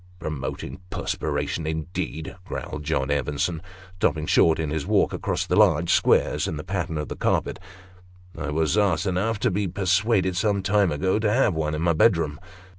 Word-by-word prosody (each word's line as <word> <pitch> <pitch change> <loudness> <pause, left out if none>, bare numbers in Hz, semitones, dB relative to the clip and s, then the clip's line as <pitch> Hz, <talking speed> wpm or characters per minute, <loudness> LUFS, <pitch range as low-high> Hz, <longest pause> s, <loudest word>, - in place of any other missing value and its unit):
" 90 - -26
Promoting 80 +1 -5
perspiration, 80 -2 -2
indeed," 80 0 -4
growled 75 -5 -5
John 70 -2 -1
Evenson, 75 +3 -1 0.4
stopping 75 -3 0
short 80 +1 +4
in 80 -2 -2
his 80 -1 -2
walk - - +2
across - - -2
the - - 0
large 85 +3 +4
squares - - +2
in 80 - -3
the 75 - -6
pattern 80 - -3
of 75 - -3
the - - -5
carpet - - 0 0.8
"I 75 - -4
was 80 +6 +1
ass 100 -4 +2
enough 100 +4 0
to 125 - +2
be 100 +2 -1
persuaded 95 +1 +1
some 100 0 +1
time 100 -2 +2
ago 95 +7 0
to 110 -1 +1
have 120 -3 +3
one 75 -1 -1
in 75 - -2
my 85 -1 +3
bedroom. 80 -5 +2
85 Hz, 180 wpm, -24 LUFS, 75-95 Hz, 0.8 s, short